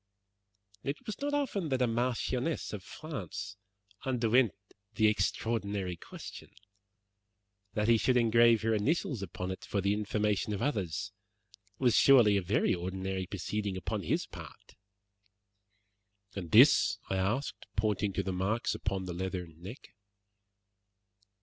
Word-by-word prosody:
It 140 +2 -2
was 215 - -6
not 290 0 0
often 205 - -1
that 130 -2 0
a - - +5
marchioness 125 +5 -1
of 105 - -5
France 135 - -6 0.5
underwent 125 -2 +2 0.4
the 110 - +3
extraordinary 105 -3 0
question. - - -10 1.3
That 105 0 +1
he 115 -1 +6
should 125 +2 +3
engrave 115 -1 +5
her 115 0 +2
initials 115 - 0
upon 90 0 -4
it 95 - -7
for 100 - -2
the 100 +1 +1
information 105 0 0
of 100 - -3
others 100 - -2 0.7
was 125 -2 +3
surely 120 -7 +6
a 100 - +2
very 90 +3 +1
ordinary 95 +1 -3
proceeding 100 0 -3
upon 95 - -3
his - - 0
part." - - -12 1.6
"And 90 -4 -5
this?" - - +6
I 95 - +1
asked, 110 +9 -2
pointing 105 -1 +1
to - - -1
the 95 - -2
marks 100 +6 0
upon 95 -2 -3
the 90 - -4
leathern 90 -2 -5
neck. 100 +9 -10
105 Hz, 130 wpm, -31 LUFS, 95-120 Hz, 1.6 s, he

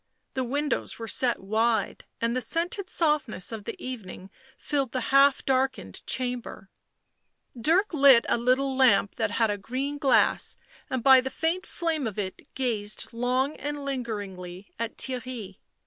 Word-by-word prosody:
The 260 - -1
windows 285 +4 -2
were 225 - -6
set 245 +1 +1
wide, 220 +3 0
and 230 +1 0
the 255 - 0
scented 350 +6 -2
softness 300 - 0
of 220 -3 -6
the - - -6
evening 195 -6 -8 0.3
filled 275 -5 -2
the 255 - 0
half 275 0 +5
darkened 265 0 -1
chamber; 245 -6 -3 0.8
Dirk 335 - +2
lit 275 -6 +6
a - - +3
little 260 +3 +1
lamp 240 -6 +4
that - - 0
had 225 -2 +1
a 205 - -3
green 275 +7 -3
glass, 275 -4 +3 0.3
and 260 -3 -2
by 265 -1 +8
the 265 - -4
faint 330 +6 -2
flame 320 -6 -2
of 215 - -6
it 190 -3 -5
gazed 225 -6 -1
long 255 +4 0
and 290 -1 -5
lingeringly 205 -8 -5
at 230 0 -4
Theirry. 250 -6 -4
255 Hz, 150 wpm, -27 LUFS, 225-275 Hz, 0.8 s, by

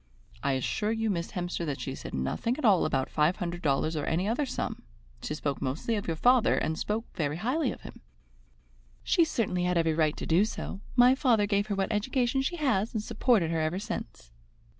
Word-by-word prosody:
"I 140 - +1
assure 210 - -1
you, 225 -1 0
Miss 170 -2 -3
Hemster, 175 -2 -3
that 140 -2 -3
she 135 - -4
said - - -7
nothing 65 - -1
at 310 - -2
all 200 -5 +5
about 135 -4 0
five 155 +4 +2
hundred 175 0 -4
dollars 155 +1 +1
or 150 - -2
any 175 +5 0
other 255 +6 0
sum. - - -4 0.4
She 150 - -3
spoke 145 -2 -3
mostly 140 - -2
of 205 - -3
your 165 - -1
father, 245 +7 +4
and 160 - -1
she - - -6
spoke 220 +2 -2
very 150 -1 -1
highly 255 - 0
of - - -9
him." - - -11 1.0
"She 340 - +4
certainly 190 - 0
had 180 -1 +1
every 165 -1 +2
right 155 -1 +1
to - - -5
do 170 +5 +4
so. 210 -2 -5
My 250 0 +7
father 245 -6 +3
gave 205 0 0
her 205 - -1
what 195 +1 -1
education 250 +4 +1
she 270 +6 -2
has 240 - 0
and 215 - -1
supported 215 -9 +2
her 165 -1 0
ever 155 +3 -1
since." 190 - -6
190 Hz, 215 wpm, -29 LUFS, 160-230 Hz, 1.0 s, My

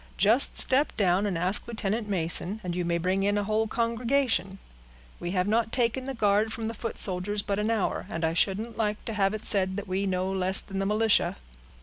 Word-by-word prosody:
Just 225 +7 +4
step 275 +3 +4
down 195 0 +2
and 185 -4 -2
ask 180 +4 -1
Lieutenant 220 -1 -3
Mason, 180 +2 -1
and 175 -1 -4
you 180 - -1
may 170 0 0
bring 185 +3 0
in 205 +1 +1
a 205 - 0
whole 215 +2 0
congregation. 230 -2 0 0.6
We 175 - -4
have 180 +1 0
not 225 +1 +1
taken 250 +1 0
the 270 0 -5
guard 210 0 +2
from 225 0 -4
the 225 - -4
foot 230 +1 -6
soldiers, 200 +2 +1
but 200 0 -2
an 210 +1 -1
hour, 220 -4 -1
and 165 0 -2
I 160 - 0
shouldn't 210 +6 -1
like 210 -2 -2
to 225 - -3
have 200 0 +1
it 215 - -7
said 190 -2 +2
that 205 0 -5
we 190 +2 -1
know 185 0 -1
less 190 0 +1
than 195 -1 -6
the 195 - -1
militia." 215 +1 +2
205 Hz, 220 wpm, -27 LUFS, 190-225 Hz, 0.6 s, Just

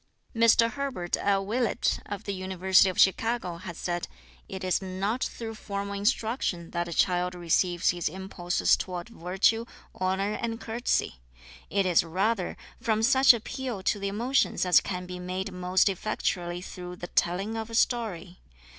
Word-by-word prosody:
Mr 230 0 +5
Herbert 260 -11 -2
L. 195 -1 +1
Willett, 235 +2 0
of 205 +1 -5
the 200 - -3
University 190 0 +3
of 185 - -4
Chicago, 195 -2 +2
has 170 -1 -8
said: 175 -1 -3 0.4
"It 190 0 -6
is 185 +1 +1
not 195 +6 -2
through 225 -1 -6
formal 200 -2 -5
instruction 205 -4 -1
that 175 0 -2
a - - -6
child 180 +1 +1
receives 175 0 +2
his 175 -3 -2
impulses 185 0 0
toward 180 +1 -5
virtue, 195 +3 +1 0.3
honour 190 +2 -1
and 230 -1 -3
courtesy. 230 - -1 0.5
It 200 -1 +1
is 180 -3 +4
rather 185 +4 -1 0.2
from 220 -1 0
such 265 +2 +7
appeal 235 -2 -3
to 205 - +1
the 200 - -2
emotions 235 +3 +1
as 180 - +6
can 180 -2 -4
be 180 0 -7
made 185 +2 -4
most 180 +1 +2
effectually 180 -3 -2
through 180 -1 -8
the 175 - -7
telling 185 +5 0
of 225 0 -4
a 230 - -5
story. 210 -8 0
190 Hz, 155 wpm, -28 LUFS, 180-225 Hz, 0.5 s, such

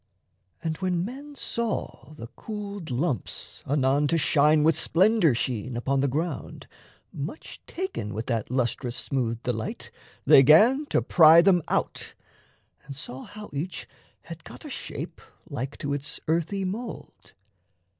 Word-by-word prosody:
And 160 -1 -2
when 180 -2 -1
men 280 +6 -8
saw 230 - -4
the 115 - -8
cooled 205 -5 -6
lumps 130 +2 -3
anon 140 +1 +2
To 165 - +2
shine 150 0 +4
with 160 0 +4
splendour 175 - +3
sheen 120 0 -2
upon 135 +3 0
the 140 - +2
ground, 150 +3 -4 0.5
Much 150 - -7
taken 370 - -4
with 110 +2 -4
that 115 -4 -2
lustrous 125 0 -1
smooth 120 -3 -2
delight, 115 -3 -4 0.3
They - - +8
'gan 225 - +6
to - - +1
pry 165 0 +7
them 180 -2 +4
out, - - -2 0.7
and 140 - -8
saw 130 -1 -7
how 210 0 -10
each 160 +6 -4 0.3
Had - - -10
got - - -12
a - - -7
shape - - -7 0.3
like 130 +3 -5
to 140 0 -3
its 145 +1 -3
earthy 170 +5 0
mould. 225 +6 -7
155 Hz, 140 wpm, -26 LUFS, 130-190 Hz, 0.7 s, They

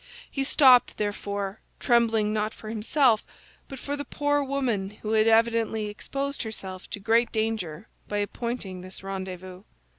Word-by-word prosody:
He 275 - -1
stopped, 260 -3 +6
therefore, 205 -1 -3 0.2
trembling 225 -3 +3
not 215 0 -1
for 215 - -9
himself 225 +1 +2 0.5
but 270 - -7
for 285 +3 -3
the 285 - -4
poor 290 +1 0
woman 255 -8 -1
who 215 - -2
had 220 0 +4
evidently 225 -1 +3
exposed 275 +6 -4
herself 190 -5 -6
to - - -5
great 230 +4 +2
danger 220 -6 -2 0.2
by 205 - -2
appointing 205 -2 -3
this 185 +1 -7
rendezvous. 185 -1 -6
220 Hz, 145 wpm, -26 LUFS, 200-245 Hz, 0.5 s, stopped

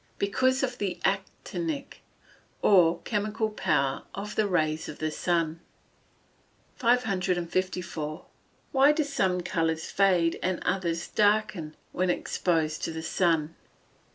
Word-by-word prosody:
_ - - -36
Because 260 +7 +1
of 250 -2 -2
the 195 -3 -2
actinic, 315 -5 -3 0.6
or 175 -4 +5
chemical 215 0 -1
power 140 -9 0
of 210 +1 -5
the 215 -1 +1
rays 155 -4 0
of 150 - -8
the 155 0 -2
sun. 165 -1 0 1.2
554. 185 -8 0 0.5
_Why 280 +2 +5
do 310 - +2
some 195 -11 0
colours 165 -2 -1
fade, 180 -4 +3
and 185 -1 0
others 175 -2 -1
darken, 205 -7 +1 0.2
when 185 0 0
exposed 160 -3 0
to - - -3
the 160 0 -5
sun? 165 -3 +1
180 Hz, 120 wpm, -28 LUFS, 165-210 Hz, 1.2 s, or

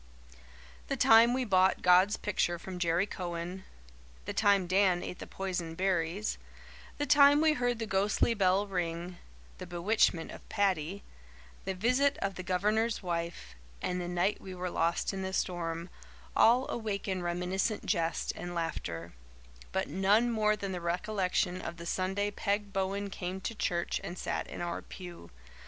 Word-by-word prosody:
The - - -2
time 225 +1 +7
we 255 0 0
bought 190 -3 +3
God's 185 +3 +5
picture 175 -4 0
from 180 +1 -7
Jerry 170 +2 +2
Cowan 180 -1 -5 0.6
the - - -4
time 200 -3 +3
Dan 185 -1 +3
ate 180 - -6
the - - -7
poison 180 -4 -4
berries 185 +2 -1 0.6
the 290 - -1
time 285 0 +7
we 315 0 +4
heard 245 -4 0
the 225 - -3
ghostly 205 +3 +2
bell 195 -1 +2
ring 175 -2 -3 0.4
the 185 - -7
bewitchment 175 -1 +1
of - - -12
Paddy 195 -2 0 0.6
the 190 - -2
visit 255 +8 +2
of 195 0 -2
the 185 - -6
Governor's 210 +5 0
wife 170 - -4 0.3
and 180 0 -2
the 175 - -4
night 175 +3 0
we 185 -1 -8
were 180 0 -4
lost 170 +4 0
in 190 - -4
the 190 0 -4
storm 170 -2 -2 0.5
all 245 +3 +5
awaken 200 -4 -2
reminiscent 180 +5 -1
jest 165 -4 0
and 175 0 -6
laughter; 85 - -4 0.6
but 190 - -1
none 205 +5 +3
more 215 -2 +2
than 200 -2 -4
the 180 -2 -4
recollection 180 +1 -1
of 170 - -6
the 170 - -8
Sunday 195 +3 -1
Peg 200 0 -2
Bowen 195 +1 -1
came 185 0 -4
to 210 - -4
church 175 -5 -1
and 180 - -6
sat - - -3
in - - -7
our 175 -1 -3
pew. 175 - -10
190 Hz, 160 wpm, -31 LUFS, 175-205 Hz, 0.6 s, time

